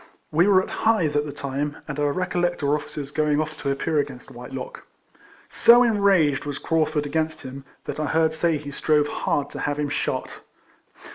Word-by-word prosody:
We 170 +5 +4
were 190 -2 +5
at - - -8
Hythe 195 -10 +2
at 145 0 +1
the - - -5
time, 140 +1 -4
and 150 -1 -5
I - - +1
recollect 175 +2 -1
our 140 +1 +2
officers 145 -1 -4
going 150 -1 +1
olF 155 0 -2
to - - -1
appear 150 +3 0
against 135 -3 -5
Whitelock. 125 +1 -8 0.6
So 240 +1 +6
enraged 200 - +3
was 145 -1 -4
Craufurd 155 -2 0
against 160 +2 -2
him, 135 +1 -8 0.2
that - - -5
I 155 - -1
heard 160 0 +2
say 160 0 +1
he 145 0 -8
strove 150 +1 +2
hard 145 -1 -1
to - - -7
have 145 0 -1
him 150 -1 -1
shot. 145 - -3
150 Hz, 190 wpm, -24 LUFS, 145-160 Hz, 0.6 s, So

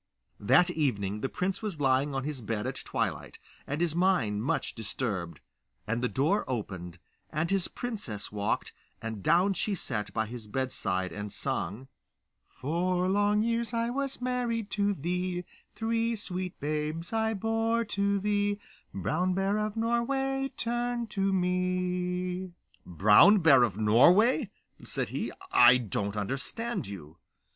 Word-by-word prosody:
That 135 - +4
evening 105 - -1
the 135 - -1
prince 190 +1 -2
was 205 -8 -4
lying 135 +1 +2
on 135 - -1
his 145 -3 -4
bed 105 -1 -3
at - - -3
twilight, - - -3 0.3
and 145 +2 -2
his 170 -2 +1
mind 170 - +2
much 165 +5 -1
disturbed; 100 - -3 0.4
and 115 +2 -1
the 125 - +2
door 155 +10 +1
opened, 95 -8 -4 0.3
and 160 +4 -1
in - - +3
his 190 -3 0
princess 200 - -5
walked, 105 -1 -2 0.3
and 110 -2 -5
down 180 - +3
she 200 +1 -1
sat 115 - -3
by 110 - 0
his 115 -1 -8
bedside 105 -7 -2
and 105 0 -6
sung: 105 +10 -3 0.6
Four 180 +5 -1
long 205 +2 +3
years 235 0 -1
I 230 +1 0
was 275 +1 -3
married 240 -4 -1
to 205 0 +1
thee; 180 +2 -2 0.3
Three 230 +1 0
sweet 185 -3 -5
babes 155 +4 -3
I 220 0 +1
bore 225 +2 0
to 200 -1 0
thee; 205 0 0 0.3
Brown 175 - 0
Bear 195 +2 +1
of 215 +1 -2
Norway, 270 +4 0
turn 240 0 -1
to 195 -1 0
me. 180 0 -1 0.3
'Brown 105 - +6
Bear 155 -8 +6
of 110 -6 +1
Norway!' 180 - +5 0.3
said - - -2
he. - - -3 0.2
'I 125 +1 +8
don't 105 -3 -2
understand 135 - -3
you. 85 -5 -9
180 Hz, 145 wpm, -29 LUFS, -, 0.6 s, I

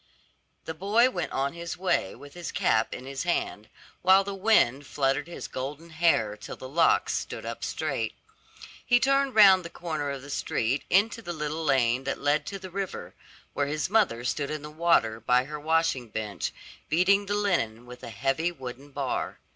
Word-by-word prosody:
The 160 - -4
boy 210 +9 +3
went - - -3
on 140 +2 -1
his 170 0 -6
way 175 - 0
with 145 0 -13
his 175 -1 -6
cap 110 0 +1
in 125 - -7
his 135 0 -5
hand, 140 - -2 0.3
while 190 +2 +6
the 200 0 -5
wind 185 - +3
fluttered 140 +2 0
his 175 - -7
golden 145 +6 -6
hair 155 -11 +2
till 105 - -9
the 130 - -9
locks 165 +5 +3
stood - - -4
up - - -6
straight. - - -2 0.7
He 245 0 +4
turned 275 0 +2
round 195 -4 +8
the 170 - -7
corner 155 -5 -4
of 140 -1 -5
the 140 - -9
street 125 0 -1
into 220 +5 +2
the 175 -5 -5
little 155 0 -3
lane 130 -3 +2
that 140 - -2
led 145 +2 +1
to 200 - -4
the 190 -1 -10
river, 195 0 -5 0.4
where 145 -1 0
his 150 +5 -2
mother 195 - +2
stood 140 +3 -1
in 155 -1 -4
the 150 - -8
water 155 -9 +2
by 125 +3 +3
her 150 +2 -7
washing 160 -5 +1
bench, 105 -4 -3 0.4
beating 195 +5 +3
the 205 - 0
linen 125 - 0
with 125 0 -11
a - - -7
heavy 135 +8 0
wooden 135 -2 -9
bar. 140 -2 -3
150 Hz, 185 wpm, -27 LUFS, 130-180 Hz, 0.7 s, round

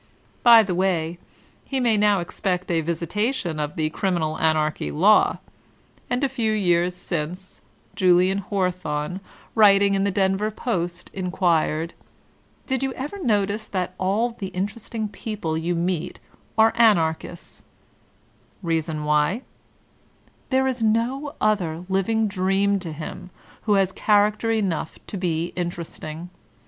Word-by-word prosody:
"' - - -35
By 230 -1 +9
the 190 -3 -2
way, 175 -2 0 0.4
he 270 - -2
may 235 -3 +3
now 205 -2 +3
expect 180 +1 -2
a 165 -1 +2
visitation 170 - -2
of 150 0 -3
the 155 -1 -1
Criminal 170 -4 -1
Anarchy 155 - +1
law. 75 - +4 0.7
And 250 +3 0
a - - +4
few 235 -4 -1
years 180 -3 +2
since, 180 +2 -5 0.3
Julian 185 +1 +4
Hawthorne, 180 -4 -2 0.4
writii^ 200 -2 +6
in 195 0 +1
the 200 - +2
Denver 195 +1 +1
Post, 175 -6 -3
inquired, 170 -3 0 0.7
''Did 265 -2 -1
you 270 -1 -1
ever 300 +10 -6
notice 210 -2 0
that 185 -2 -3
all 205 +6 +1
the 220 -4 -6
interesting 210 +4 -4
people 205 -6 -4
you 165 +2 -1
meet 175 0 -2 0.4
are 220 0 +5
Anarchists 170 -7 +1 1.0
V* 170 - -4
Rea 165 -1 +2
son 155 -1 -5
why: 150 - +1 1.1
there 265 0 +2
is 255 -2 -1
no 240 +6 0
other 180 -6 0
living 215 +4 +1
dream 195 +1 +1
to 175 -3 -6
him 155 +3 -7 0.4
who 210 - +4
has 195 -1 +2
character 210 +2 +2
enough 195 -8 -1
to - - -7
be 170 -2 -2
interesting. 170 -1 -5
190 Hz, 135 wpm, -23 LUFS, 170-215 Hz, 1.1 s, By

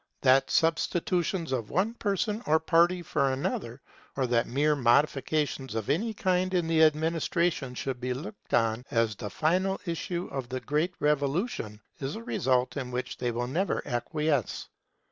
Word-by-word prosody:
That 135 0 +4
substitutions 170 +1 +1
of 120 -5 -2
one 205 +6 +1
person 210 0 -1
or 155 +1 +4
party 175 +2 +3
for 140 -4 +1
another, 130 -2 -3 0.4
or 135 - +2
that 120 -1 +1
mere 150 +4 +2
modifications 135 0 +1
of 110 +1 -1
any 215 +10 0
kind 185 -2 0
in 175 -2 +2
the 165 -1 +3
administration 160 -2 +1
should 130 -1 -4
be 125 +1 -2
looked 195 - -9
on 115 0 +1
as 115 -2 +1
the 105 - -6
final 185 - +1
issue 170 +1 -3
of 135 -3 -4
the 130 - -3
great 155 +5 -1
Revolution, 145 - 0 0.2
is 135 0 -3
a 115 - -7
result 125 +2 +1
in 130 -3 -3
which 125 +1 -4
they 125 - 0
will 120 +1 -2
never 170 +11 -1
acquiesce. 140 - -1
150 Hz, 160 wpm, -28 LUFS, 125-170 Hz, 0.4 s, That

